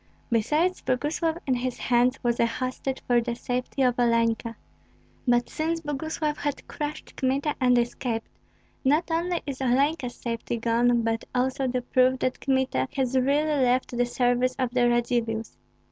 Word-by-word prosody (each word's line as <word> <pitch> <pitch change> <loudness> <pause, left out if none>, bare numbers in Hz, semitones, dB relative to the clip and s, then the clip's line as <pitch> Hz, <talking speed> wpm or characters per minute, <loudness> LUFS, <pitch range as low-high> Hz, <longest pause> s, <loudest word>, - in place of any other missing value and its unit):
Besides, 300 +11 +1
Boguslav 310 +5 0
in 265 - +1
his 250 0 -2
hands 245 +2 +2
was 240 -1 +1
a - - +5
hostage 255 +2 -3
for 240 -1 +3
the 235 0 -3
safety 250 +3 -2
of 250 -1 +2
Olenka. 230 -1 +1 0.7
But 240 0 +3
since 330 +1 -2
Boguslav 300 0 -2
has 290 -1 -1
crushed 300 0 -6
Kmita 275 +3 0
and 250 -1 +4
escaped, 235 -1 -1 0.6
not 305 +5 +2
only 340 +2 0
is 275 -2 -5
Olenka's 265 0 +1
safety 235 0 -3
gone, 235 +1 +2
but 225 0 -1
also 260 +2 +1
the 250 0 -1
proof 255 +1 +3
that 255 - -1
Kmita 265 - +1
has 265 -1 0
really 285 +2 +2
left 250 0 +1
the 245 0 +1
service 245 +1 +1
of 255 -3 -1
the 245 -1 +3
Radzivills. 235 -2 0
255 Hz, 155 wpm, -26 LUFS, 240-280 Hz, 0.7 s, a